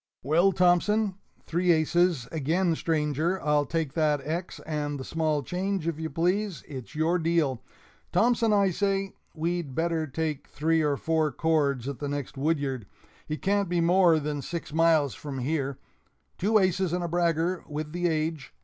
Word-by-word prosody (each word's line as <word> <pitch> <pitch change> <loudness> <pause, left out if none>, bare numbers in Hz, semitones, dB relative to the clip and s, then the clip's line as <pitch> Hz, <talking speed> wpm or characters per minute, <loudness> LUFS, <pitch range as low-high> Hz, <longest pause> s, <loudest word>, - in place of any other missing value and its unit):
"Well, 165 +8 +4
Thompson 190 +4 +3 0.3
(Three 175 +2 +2
aces, 165 -3 +2
again, 165 +4 +1
stranger 160 +2 0
I'll 150 -1 +1
take 160 -3 -2
that 150 -2 +2
X 170 +4 -4
and 145 -2 -3
the - - -5
small 155 -1 -1
change, 185 +1 -2
if 165 -2 -2
you 160 0 -3
please. 180 +4 -1
It's 130 -2 -8
your 165 +3 +2
deal) 160 -7 +1 0.5
Thompson, 230 +3 +3
I 200 -2 +3
say, 195 +1 -1 0.2
we'd 165 -4 -2
better 165 -1 0
take 155 0 -3
three 160 +2 +1
or 145 -2 +1
four 160 -1 +1
cords 140 -4 +1
at 140 -2 -5
the 145 - -3
next 145 -1 -4
woodyard 140 -6 -1 0.4
it 155 - -4
can't 200 -1 +1
be 175 -1 +1
more 170 -1 +4
than 145 -1 -3
six 165 +2 -6
miles 160 -4 +3
from 145 -2 -7
here 140 0 -2 0.6
(Two 215 +4 +3
aces 185 -2 +1
and 180 0 -1
a - - -1
bragger, 170 +1 0
with 150 0 -5
the 175 +1 0
age! 155 -2 -2
160 Hz, 165 wpm, -27 LUFS, 150-175 Hz, 0.6 s, Well